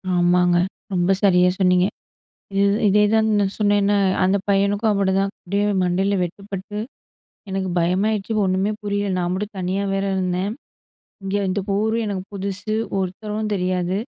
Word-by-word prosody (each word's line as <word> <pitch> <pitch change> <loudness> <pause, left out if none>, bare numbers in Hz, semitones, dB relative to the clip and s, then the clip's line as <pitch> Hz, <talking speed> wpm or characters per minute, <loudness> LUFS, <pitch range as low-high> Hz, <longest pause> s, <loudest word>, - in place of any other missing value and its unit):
ஆமாங்க, 175 0 +3 0.4
ரொம்ப 180 +1 +2
சரியா 180 -2 +5
சொன்னீங்க. 180 -1 +4 0.7
இது 200 +1 +3 0.2
இதேதான் 210 +2 +3
நான் 195 -1 +1
சொன்னேன்ல, 205 0 +3 0.3
அந்த 190 +2 +3
பையனுக்கும் 200 +2 +2
அப்படிதான். 195 -1 +1
அப்படியே 200 +3 -1 0.2
மண்டையில 190 +3 +1
வெட்டுப்பட்டு 195 +3 -6 0.7
எனக்கு 190 -1 -2
பயமாயிருச்சு 195 +5 0
ஒண்ணுமே 190 +3 +1
புரியல, 205 -1 -1
நான் 175 0 -1
மட்டும் 205 +2 -4
தனியா 185 +2 -1
வேற 195 - 0
இருந்தேன். 185 +1 -1 0.7
இங்கே 195 +1 -1
இந்த 195 +2 0 0.2
ஊரு 220 +2 +1
எனக்கு 195 -2 -3
புதுசு, 200 +2 -3 0.2
ஒருத்தரும் 210 +3 -3
தெரியாது, 185 0 -1
195 Hz, 130 wpm, -21 LUFS, 185-205 Hz, 0.7 s, சரியா